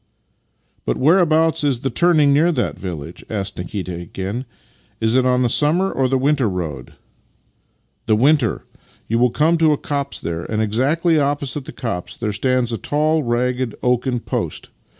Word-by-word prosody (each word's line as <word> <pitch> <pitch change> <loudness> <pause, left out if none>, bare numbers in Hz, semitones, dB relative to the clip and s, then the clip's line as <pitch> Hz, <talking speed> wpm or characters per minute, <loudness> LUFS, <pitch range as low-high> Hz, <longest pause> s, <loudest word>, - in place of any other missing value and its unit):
" - - -44
But - - 0
whereabouts 160 +1 +3
is 135 -5 0
the 135 - -2
turning 155 0 +4
near 160 +5 +4
that 125 - -2
village? 85 -3 -7
" - - -37
asked 100 -2 -3
Nikita 90 0 -4
again. 95 +8 -5 0.3
" - - -36
Is 110 0 +1
it 130 0 +3
on 125 0 +2
the - - +3
summer 160 +10 +2
or 135 -1 +1
the 135 +1 +1
winter 135 -3 +2
road? 80 -9 -5 0.4
" - - -42
" - - -45
The 110 -2 +3
vv'inter. 135 -3 +3 0.5
You 115 +1 0
will 125 +1 +4
come 160 +6 +2
to 160 -2 +4
a - - -1
copse 140 -1 -3
there, 85 0 -4
and 110 - -2
exactly 145 - +2
opposite 140 -1 -1
the - - -8
copse 115 -8 -5
there 105 -3 -2
stands 125 +3 0
a 115 - -3
tall, 155 +2 +1
ragged 125 -1 -1
oaken 125 0 +1
post. - - -4
130 Hz, 185 wpm, -20 LUFS, 110-150 Hz, 0.5 s, turning